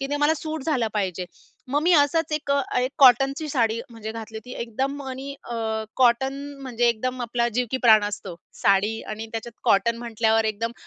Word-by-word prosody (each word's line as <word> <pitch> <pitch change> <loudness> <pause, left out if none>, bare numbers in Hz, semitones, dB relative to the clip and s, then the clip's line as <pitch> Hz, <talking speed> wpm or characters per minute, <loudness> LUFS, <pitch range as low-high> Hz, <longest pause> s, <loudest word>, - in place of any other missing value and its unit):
की 275 - -2
ते 290 - 0
मला 295 +2 +3
सूट 310 -1 -5
झालं 255 -8 +1
पाहिजे. 185 -3 -2 0.4
मग 290 +3 0
मी 350 +2 +4
असाच 310 +2 +3
एक 300 -1 -2
अ, 280 0 +3 0.2
एक 255 +1 0
कॉटनची 270 +4 +5
साडी 230 -4 +1
म्हणजे 220 -1 -7
घातली 220 -1 -8
होती 250 +3 -11
एकदम 270 +5 -3
आणि 270 +2 -6
अ, 240 - -6 0.4
कॉटन 260 +2 +3 0.3
म्हणजे 240 -2 +1
एकदम 255 +3 -1
आपला 235 0 0
जीव 245 +2 -1
की 260 - 0
प्राण 220 -3 +6
असतो. 200 -3 -5 0.3
साडी 200 +3 +3
आणि 215 +1 -5
त्याच्यात 230 +1 -7
कॉटन 215 +4 +3
म्हटल्यावर 225 -1 +1
एकदम 220 +2 -2
240 Hz, 190 wpm, -24 LUFS, 220-275 Hz, 0.4 s, प्राण